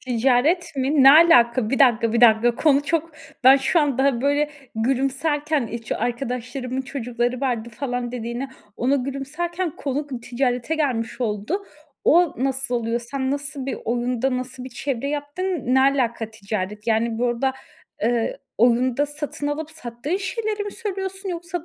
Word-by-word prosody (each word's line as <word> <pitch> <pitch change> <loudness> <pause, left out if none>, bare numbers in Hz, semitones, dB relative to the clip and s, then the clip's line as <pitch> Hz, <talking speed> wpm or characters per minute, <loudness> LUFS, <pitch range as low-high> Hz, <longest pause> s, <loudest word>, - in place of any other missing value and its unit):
Ticaret 260 +8 +1
mi? 270 +2 +2
Ne 270 - +10
alaka? 245 -8 +5
Bir 270 - 0
dakika 235 -4 +4
bir 235 - +2
dakika, 235 0 +5
konu 280 +2 +3
çok 330 +2 -1 0.3
ben 265 +2 +9
şu 275 +5 +2
anda, 270 -3 +1
böyle, 285 +2 +1 0.2
gülümserken 275 +4 0
hiç 230 -1 -5
"Arkadaşlarımın 250 +2 -3
çocukları 245 -2 -2
vardı" 240 -4 -1
falan 245 0 -4
dediğine, 240 +2 -4 0.3
ona 265 +4 +2
gülümserken 305 +7 -3
konu 285 +1 -3
kı 255 -4 -6
ticarete 250 +3 -1
gelmiş 255 -6 -1
oldu. 225 - -2 0.4
O 345 +1 +4
nasıl 265 -2 -1
oluyor? 235 0 -1
Sen 265 +2 -3
nasıl 280 -1 -4
bir 275 - -3
oyunda 245 +2 0
nasıl 255 0 -6
bir - - -6
çevre 270 +1 -3
yaptın? 290 +5 -4 0.3
Ne 265 - +5
alaka 250 -5 +1
ticaret? 210 0 -5
Yani, 225 0 +1
burada, 245 +2 0 0.5
eee, 235 0 0 0.2
oyunda 250 +4 +3
satın 290 0 -4
alıp 300 +1 -3
sattığın 280 +2 -4
şeyleri 420 +2 -3
mi 410 - -5
söylüyorsun 385 -3 -5
yoksa 345 -1 -4
265 Hz, 145 wpm, -23 LUFS, 240-290 Hz, 0.5 s, Ne